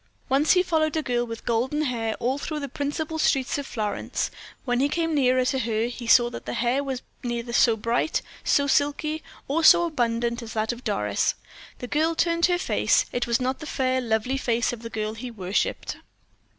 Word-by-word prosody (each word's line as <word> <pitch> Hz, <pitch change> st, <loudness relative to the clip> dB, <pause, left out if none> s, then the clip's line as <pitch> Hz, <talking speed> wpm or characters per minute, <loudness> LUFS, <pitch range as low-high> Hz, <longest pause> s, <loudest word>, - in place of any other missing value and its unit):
Once 275 Hz, +4 st, +4 dB
he 365 Hz, -1 st, +4 dB
followed 320 Hz, -3 st, +1 dB
a 310 Hz, -, 0 dB
girl 240 Hz, -2 st, 0 dB
with 230 Hz, 0 st, -7 dB
golden 255 Hz, +6 st, 0 dB
hair 230 Hz, -5 st, -1 dB
all 260 Hz, +4 st, -1 dB
through 305 Hz, +1 st, -4 dB
the 280 Hz, -, -4 dB
principal 295 Hz, +4 st, -3 dB
streets 270 Hz, -2 st, +1 dB
of 280 Hz, -, -5 dB
Florence; 210 Hz, -2 st, -2 dB, 0.3 s
when 245 Hz, -2 st, +1 dB
he 280 Hz, +2 st, +2 dB
came 330 Hz, +1 st, 0 dB
nearer 255 Hz, -3 st, +3 dB
to 265 Hz, +1 st, 0 dB
her, 225 Hz, -2 st, 0 dB
he 240 Hz, 0 st, -6 dB
saw 240 Hz, +1 st, +6 dB
that 240 Hz, -, -8 dB
the -, -, -3 dB
hair 245 Hz, +4 st, +1 dB
was 265 Hz, -2 st, -4 dB, 0.2 s
neither 235 Hz, -1 st, -3 dB
so 230 Hz, -2 st, +4 dB
bright, 230 Hz, +8 st, 0 dB, 0.2 s
so 285 Hz, -, +3 dB
silky, 290 Hz, +2 st, +1 dB, 0.3 s
or 320 Hz, +4 st, 0 dB
so 345 Hz, +2 st, +7 dB
abundant 235 Hz, -5 st, -1 dB
as 225 Hz, -2 st, -8 dB
that 220 Hz, +1 st, 0 dB
of 240 Hz, +1 st, -8 dB
Doris. 105 Hz, -, 0 dB, 0.4 s
The -, -, -6 dB
girl 315 Hz, +5 st, +1 dB
turned 335 Hz, +1 st, +2 dB
her 355 Hz, -1 st, +2 dB
face 355 Hz, -, +2 dB
it 245 Hz, -, -1 dB
was 235 Hz, +1 st, +2 dB
not 260 Hz, +1 st, -1 dB
the 310 Hz, -, -7 dB
fair, 260 Hz, -2 st, 0 dB
lovely 230 Hz, +3 st, 0 dB
face 235 Hz, -2 st, 0 dB
of 235 Hz, -, -7 dB
the 230 Hz, -, -7 dB
girl 215 Hz, -1 st, -3 dB
he 240 Hz, +3 st, -7 dB
worshiped. 195 Hz, -3 st, -2 dB
250 Hz, 205 wpm, -25 LUFS, 235-290 Hz, 0.4 s, so